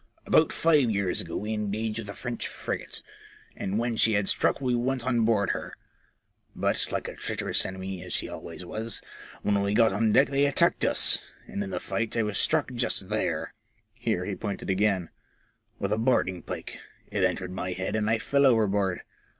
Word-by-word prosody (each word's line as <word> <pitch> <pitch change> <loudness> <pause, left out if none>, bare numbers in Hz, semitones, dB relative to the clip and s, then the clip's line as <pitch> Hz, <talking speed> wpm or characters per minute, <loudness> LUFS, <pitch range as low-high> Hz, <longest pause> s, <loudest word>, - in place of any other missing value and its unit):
" - - -34
About - - +4
five 150 -7 +4
years 100 -4 +1
ago 85 - -5
we 105 +1 -2
engaged 105 +1 -2
with 105 -3 -6
a - - -4
French 120 -2 -4
frigate, - - -5 0.5
and 100 +2 -2
when 120 0 0
she 110 0 +4
had 100 -1 +1
struck - - +2
we 130 -2 0
went 125 +1 0
on 120 -3 +2
board 105 -4 +2
her; - - -5 0.8
but, - - 0
like - - -2
a - - -5
treacherous - - -1
enemy, 95 -1 -5
as 90 - -8
she - - 0
always 85 +2 -8
was, 110 +5 -3 0.4
when 100 -1 +2
we 100 +1 0
got 115 -3 +5
on 110 +2 +2
deck 140 - +5
they 140 +1 +3
attacked 140 - +3
us, - - +4 0.3
and 100 - -4
in 100 - -5
the 90 -2 -2
fight 115 +4 -2
I 115 - +3
was 105 -1 -1
struck 155 -4 +1
just 120 -5 -1
there," 80 -7 -1 0.4
here 100 -6 -1
he 100 - -3
pointed 100 -2 -3
again, 95 -3 +1 0.7
with 100 +1 -1
a 110 - 0
boarding 105 -7 +2
pike. - - -6 0.3
It - - 0
entered 90 -1 0
my 95 0 -3
head 95 +3 -3
and 110 0 +1
I 115 - +3
fell 140 +5 +3
overboard. 100 -6 +2
105 Hz, 195 wpm, -27 LUFS, 95-115 Hz, 0.8 s, got